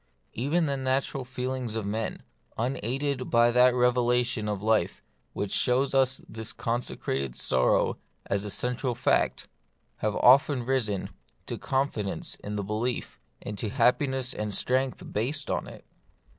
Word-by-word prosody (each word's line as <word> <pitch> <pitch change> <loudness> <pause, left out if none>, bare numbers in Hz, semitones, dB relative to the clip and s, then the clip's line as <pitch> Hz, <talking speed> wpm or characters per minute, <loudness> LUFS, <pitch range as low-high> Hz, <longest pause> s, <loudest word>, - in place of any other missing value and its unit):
Even 150 +8 +1
the 140 -2 0
natural 135 +1 0
feelings 125 -2 -3
of 110 -2 -2
men, 110 +2 -3 0.3
unaided 130 +3 -1
by 120 0 +5
that 125 +1 +5
revelation 125 -2 +2
of 100 -1 -3
life 110 0 +1 0.3
which 100 -1 -3
shows 130 +2 +2
us 135 0 +2
this 110 0 -4
consecrated 70 - -2
sorrow 65 -1 +2 0.3
as 100 0 -1
its 105 - -3
central 125 0 -1
fact, 120 - +1 0.5
have 105 -1 -1
often 130 0 +5
risen 115 -7 -1 0.3
to - - -4
confidence 120 - -2
in 105 0 -4
the 100 - -2
belief, 110 +5 -3 0.2
and 105 -2 -5
to 110 - -1
happiness 130 +2 +2
and 105 -2 -2
strength 130 +1 0
based 140 +7 -1
on - - -1
it. - - -12
125 Hz, 140 wpm, -28 LUFS, 105-130 Hz, 0.5 s, by